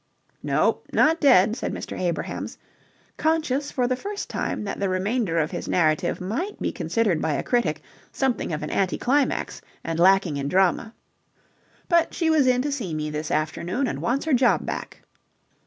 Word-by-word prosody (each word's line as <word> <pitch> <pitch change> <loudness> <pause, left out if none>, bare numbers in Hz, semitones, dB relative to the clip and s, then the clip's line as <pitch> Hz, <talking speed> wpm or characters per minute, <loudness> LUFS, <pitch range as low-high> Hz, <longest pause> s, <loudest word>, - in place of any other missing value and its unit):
"No, - - +1
not 325 +2 +3
dead," 220 - +5
said - - -3
Mr. - - -6
Abrahams, 175 -3 -3 0.6
conscious 305 -3 0
for 250 - 0
the 255 - +1
first 400 +9 -6
time - - -2
that 200 - -4
the 200 -1 0
remainder 190 0 0
of 155 -2 +1
his - - -5
narrative 165 +1 +1
might 255 - -3
be - - -1
considered 210 -9 0
by 160 - 0
a 140 - -1
critic 160 -12 0 0.3
something 265 -9 -1
of 150 -1 -3
an 150 - -4
anti 190 -2 0
climax 275 +3 0 0.2
and 165 0 -3
lacking 185 -4 +4
in 140 0 -2
drama. 190 +6 +1 0.9
"But 340 -2 +2
she 330 -2 +1
was 300 -4 +4
in 250 0 +3
to 290 - -1
see 210 - -3
me 150 0 -3
this 150 +1 -4
afternoon 170 - -1
and - - -3
wants 265 +5 0
her 315 - +1
job 250 -1 +3
back." - - -6
215 Hz, 175 wpm, -24 LUFS, 170-270 Hz, 0.9 s, dead